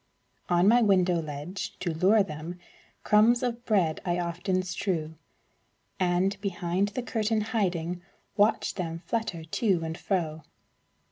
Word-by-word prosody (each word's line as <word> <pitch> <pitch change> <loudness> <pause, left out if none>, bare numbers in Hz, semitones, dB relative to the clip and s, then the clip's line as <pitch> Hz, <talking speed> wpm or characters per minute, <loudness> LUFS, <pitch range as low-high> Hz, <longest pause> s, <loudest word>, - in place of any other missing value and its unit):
On 175 +1 +4
my 240 +3 +6
window 185 -5 +3
ledge, 155 +5 -6
to 175 -3 -2
lure 195 +6 +4
them, 160 0 -7 0.5
Crumbs 230 +4 +4
of 240 -1 -2
bread 185 -8 +1
I 175 -1 0
often 180 +2 -1
strew, 175 -3 -2 0.9
And, 185 +2 +1
behind 185 0 -1
the 255 - -2
curtain 220 -2 0
hiding, 180 -6 -1 0.3
Watch 210 +1 +2
them 165 -2 -4
flutter 220 -8 -2
to 180 +1 0
and 160 0 -3
fro. 165 -5 -2
185 Hz, 130 wpm, -28 LUFS, 170-210 Hz, 0.9 s, my